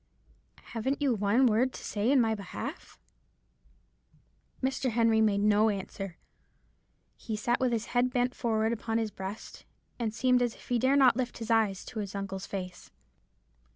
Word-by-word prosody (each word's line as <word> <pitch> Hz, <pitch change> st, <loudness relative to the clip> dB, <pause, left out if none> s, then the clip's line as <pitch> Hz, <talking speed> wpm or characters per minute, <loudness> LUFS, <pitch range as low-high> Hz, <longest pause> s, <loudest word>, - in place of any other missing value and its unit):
Haven't 260 Hz, +5 st, -1 dB
you 280 Hz, -4 st, +2 dB
one 210 Hz, +5 st, +3 dB
word 245 Hz, +3 st, +3 dB
to -, -, -9 dB
say 210 Hz, +4 st, 0 dB
in 280 Hz, -, +5 dB
my 225 Hz, -2 st, +3 dB
behalf?' 200 Hz, -4 st, -7 dB, 1.7 s
"Mr. 265 Hz, 0 st, 0 dB
Henry 225 Hz, -1 st, +3 dB
made 205 Hz, -2 st, +2 dB
no 210 Hz, +1 st, +4 dB
answer. 195 Hz, -2 st, -5 dB, 1.0 s
He 220 Hz, -, -4 dB
sat 240 Hz, +3 st, 0 dB
with 255 Hz, -1 st, +1 dB
his 230 Hz, -1 st, -1 dB
head 245 Hz, +1 st, +3 dB
bent 250 Hz, 0 st, 0 dB
forward 220 Hz, -1 st, 0 dB
upon 225 Hz, 0 st, -2 dB
his 220 Hz, -2 st, -1 dB
breast, 190 Hz, +3 st, -8 dB, 0.4 s
and 230 Hz, -2 st, -1 dB
seemed 250 Hz, +2 st, +2 dB
as 240 Hz, -2 st, 0 dB
if -, -, -17 dB
he 245 Hz, -1 st, +2 dB
dare 260 Hz, +3 st, +3 dB
not 260 Hz, -4 st, +5 dB
lift 250 Hz, -2 st, -2 dB
his 230 Hz, 0 st, -4 dB
eyes 215 Hz, -4 st, +2 dB
to 225 Hz, -, -6 dB
his 200 Hz, -1 st, -5 dB
uncle's 195 Hz, -1 st, -5 dB
face. 185 Hz, -2 st, -6 dB
225 Hz, 165 wpm, -29 LUFS, 205-245 Hz, 1.7 s, in